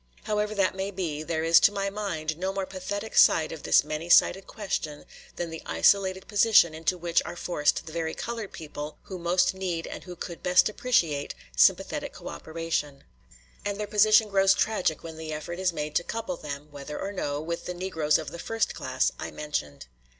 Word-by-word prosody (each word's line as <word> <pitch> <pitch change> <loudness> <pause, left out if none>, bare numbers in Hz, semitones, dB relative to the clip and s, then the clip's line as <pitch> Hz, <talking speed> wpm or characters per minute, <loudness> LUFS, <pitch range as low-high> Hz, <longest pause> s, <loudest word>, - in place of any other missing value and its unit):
However 210 0 -1
that 195 -2 +2
may 190 +1 -3
be, 175 -6 -3
there 160 0 -2
is 165 +1 +7
to - - +5
my 200 -1 -2
mind 165 -7 -3
no 185 +4 -2
more 195 0 -2
pathetic 200 +3 -5
side 160 - +5
of 160 - -7
this - - +4
many 155 +3 -5
sided 190 +2 +5
question 160 -8 -4 0.3
than 170 -1 -4
the 165 - -6
isolated 190 -1 +2
position 205 -5 +5
into 165 +3 -1
which 170 -1 +1
are - - -7
forced 160 -4 0
the 160 - -8
very 160 -1 -3
colored 230 -3 -5
people 150 -1 -7
who 185 -2 -7
most 175 +2 +2
need 180 -3 -3
and - - -8
who 180 -1 -8
could 170 0 -7
best 180 +3 +4
appreciate 170 - 0 0.2
sympathetic - - +3
cooperation; 160 - -4 0.6
and 205 0 -3
their 210 - -1
position 215 +1 +5
grows 195 -1 +4
tragic 185 -8 0
when 165 -1 -8
the 160 -1 -6
effort 155 +3 -5
is 185 -1 +2
made 150 -2 -4
to 175 - +1
couple 230 +8 -4
them, 145 - -7
whether 145 +1 -7
or 195 - -3
no, 145 -7 -2
with 170 +2 -4
the 180 - -3
Negroes 165 -5 +1
of 155 - -6
the 170 - -8
first 225 +4 -1
class - - 0
I - - -4
mentioned. 110 - -4
175 Hz, 195 wpm, -27 LUFS, 155-195 Hz, 0.6 s, is